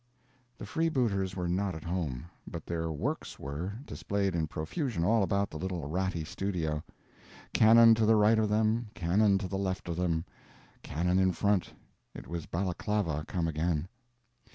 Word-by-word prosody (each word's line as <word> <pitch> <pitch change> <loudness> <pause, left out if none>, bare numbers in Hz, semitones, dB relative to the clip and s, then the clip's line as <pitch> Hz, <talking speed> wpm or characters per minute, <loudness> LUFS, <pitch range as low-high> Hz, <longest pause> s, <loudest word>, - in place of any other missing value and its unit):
The - - -7
freebooters 120 - 0
were 90 -2 -2
not 95 +1 0
at 80 - -8
home. 85 -6 -3 0.2
But 85 -3 -7
their 80 -1 -2
"works" 75 - -3
were, 75 +8 -4
displayed 100 -6 -1
in 80 -2 0
profusion 90 - -2
all 110 +5 +3
about 100 +1 +1
the 80 - -6
little 90 -4 -3
ratty 90 +1 -1
studio. 80 -5 -2 0.7
Cannon 115 +1 +8
to 110 -1 +2
the 110 - +6
right 110 +1 +5
of 110 -1 +1
them, 110 +2 +2
cannon 95 +4 +3
to 95 -1 -3
the 95 +1 -3
left 95 -3 -2
of 85 -1 -3
them, 85 -2 0 0.6
cannon 90 +5 0
in 95 -1 +3
front—it 100 +1 -3
was 85 -1 -5
Balaclava 90 -3 -1
come 85 -2 -1
again. 80 +1 -1
95 Hz, 155 wpm, -30 LUFS, 85-105 Hz, 0.7 s, Cannon